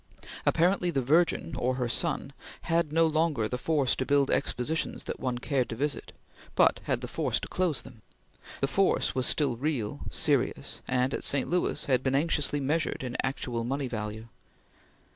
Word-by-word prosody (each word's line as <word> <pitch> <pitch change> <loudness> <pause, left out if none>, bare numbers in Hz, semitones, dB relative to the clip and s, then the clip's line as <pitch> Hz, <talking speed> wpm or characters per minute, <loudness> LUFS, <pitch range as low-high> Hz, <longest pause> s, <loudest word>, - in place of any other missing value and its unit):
Apparently 180 +1 +3
the 135 -6 0
Virgin 165 +3 +2
or 125 +1 0
her 125 -2 -1
Son - - -1 0.3
had 165 -2 +1
no 165 +1 +4
longer 155 -7 +1
the 125 +3 -4
force 145 -3 +1
to - - -1
build 140 0 +2
expositions 145 +3 -1
that - - -5
one 125 -2 -2
cared 130 0 0
to - - -4
visit, 145 +4 -2 0.4
but - - +4
had - - 0
the - - -5
force - - -1
to - - -6
close 180 -6 -1
them. 125 -4 -14 0.6
The 135 - +2
force 195 +6 +2
was 130 -2 0
still 140 -5 +1
real, 130 -6 -2
serious, - - 0
and, 130 +1 +1
at - - -2
St. 140 -2 +3
Louis, 180 0 0
had 130 -3 +2
been 130 0 0
anxiously 145 -1 +1
measured 145 +1 -1
in 125 -1 -4
actual 125 -3 -2
money 135 +3 -2
value. 110 -1 -5
135 Hz, 175 wpm, -28 LUFS, 125-155 Hz, 0.6 s, no